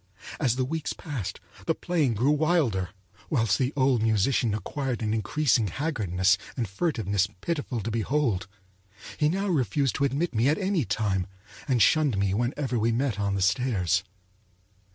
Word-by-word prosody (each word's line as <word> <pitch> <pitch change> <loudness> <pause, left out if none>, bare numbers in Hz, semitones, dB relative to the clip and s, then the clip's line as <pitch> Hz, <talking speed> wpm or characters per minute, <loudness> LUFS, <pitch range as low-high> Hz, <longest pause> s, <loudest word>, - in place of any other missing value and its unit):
As 125 -6 +2
the 130 0 0
weeks 160 +3 -3
passed, 120 - -5 0.3
the 165 - +2
playing 155 -9 0
grew 125 +7 +2
wilder, 150 - +1 0.4
whilst 115 - +2
the 130 0 +1
old 130 -4 +3
musician 110 +1 +2
acquired 125 +1 -3
an 110 0 0
increasing 115 0 +1
haggardness 100 - +1 0.2
and 120 -4 -1
furtiveness 100 - 0
pitiful 145 - -2
to 115 - -3
behold. 115 -3 0 0.7
He 150 -1 +3
now 195 +4 -1
refused 135 - +1
to - - 0
admit 140 +6 -1
me 115 +4 +3
at 155 - +2
any 190 - 0
time, 95 -5 -1 0.4
and 125 -4 +4
shunned 150 -9 +3
me 100 -1 +1
whenever 120 +3 -1
we 115 +2 +2
met 120 -2 0
on 100 -1 0
the 95 - 0
stairs. 95 -3 +1
125 Hz, 155 wpm, -27 LUFS, 105-145 Hz, 0.7 s, and